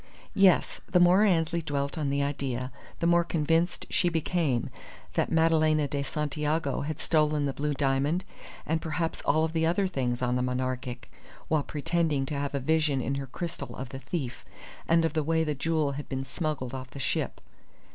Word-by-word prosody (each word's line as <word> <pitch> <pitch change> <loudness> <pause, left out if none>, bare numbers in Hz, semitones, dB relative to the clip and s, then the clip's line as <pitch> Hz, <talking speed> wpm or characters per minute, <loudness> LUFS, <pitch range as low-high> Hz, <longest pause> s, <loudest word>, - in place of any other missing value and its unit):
Yes, 195 -3 +4
the 180 - +5
more 180 +3 +6
Annesley 170 -3 +2
dwelt 140 -1 -2
on 150 -4 -1
the 140 0 +1
idea 130 -3 -2 0.3
the - - 0
more 170 0 +5
convinced 165 +1 +1
she 175 - +3
became 160 -6 0 0.4
that - - 0
Madalena 155 -2 +3
de 140 0 -2
Santiago 150 +1 -1
had 155 +1 -4
stolen 150 -2 +2
the 140 - -1
blue 145 +1 -1
diamond, 140 +6 +1 0.4
and 160 +1 0
perhaps 165 +1 -2
all 155 +2 +2
the 160 0 -1
other 185 +4 +2
things 130 -8 -1
on 125 0 +1
the 125 - +1
Monarchic, 125 0 -3 0.4
while 155 -2 +3
pretending 155 -1 0
to 140 - -5
have 140 0 -2
a - - +1
vision 150 0 +2
in 130 +2 -1
her 140 -1 -3
crystal 170 +6 -5
of 130 -1 -6
the 135 - -7
thief, 135 -5 -4 0.4
and 165 0 +4
of 165 - 0
the 155 - +1
way 160 +2 +1
the 150 -1 -1
jewel 155 0 0
had 140 +1 -6
been 135 -1 -3
smuggled 135 -3 -3
off 130 -1 -6
the - - -11
ship. 135 - -1
150 Hz, 185 wpm, -28 LUFS, 135-165 Hz, 0.4 s, more